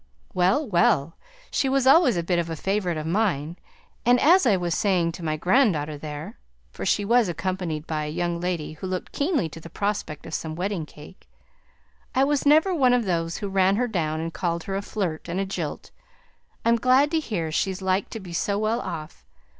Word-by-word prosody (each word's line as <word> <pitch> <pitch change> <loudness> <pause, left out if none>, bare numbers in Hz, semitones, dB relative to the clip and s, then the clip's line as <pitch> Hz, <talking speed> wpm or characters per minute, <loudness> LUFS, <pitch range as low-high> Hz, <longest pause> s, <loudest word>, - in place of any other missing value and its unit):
"Well, 185 +12 +2
well! 170 -5 +2 0.4
she 270 - +1
was 270 -1 +2
always 265 - +6
a 170 - 0
bit 175 0 +1
of 170 -1 -2
a 165 - -3
favourite 190 -1 -1
of 155 - -4
mine; 170 -4 0 0.5
and 245 +1 +4
as 345 +1 +5
I 205 -4 +4
was 175 -2 -1
saying 180 -2 +1
to 170 - -9
my 155 -1 -1
grand 215 - +3
daughter 150 0 -3
there" 150 +1 -7 0.3
(for - - -5
she 205 - +2
was 235 -2 +3
accompanied 175 -3 -3
by 155 -2 -2
a - - -4
young 175 +1 -2
lady, 175 -4 -2
who 160 +5 -7
looked 185 -1 -4
keenly 290 - 0
to 165 - -10
the 165 - -11
prospect 200 -5 -3
of - - -8
some 160 -1 -3
wedding 180 -2 -3
cake), 150 +5 -15 0.9
"I 265 - +4
was 285 0 +1
never 315 +6 +5
one 255 -7 +4
of 240 -2 0
those 165 -2 -1
who 205 - -4
ran 195 0 +3
her 245 +3 +1
down 160 -8 -1
and 165 +1 -4
called 170 +2 -2
her 195 - -4
a 195 - -1
flirt 180 -6 -4
and 175 +3 -2
a 195 - 0
jilt. 190 - -5 0.7
I'm 235 0 +4
glad 255 +5 +4
to 325 - +2
hear 180 - -3
she's 190 +3 -1
like 190 +1 0
to 225 - -6
be 180 -4 -9
so 200 +4 0
well 215 +3 0
off. 155 -2 -7
185 Hz, 210 wpm, -25 LUFS, 165-225 Hz, 0.9 s, always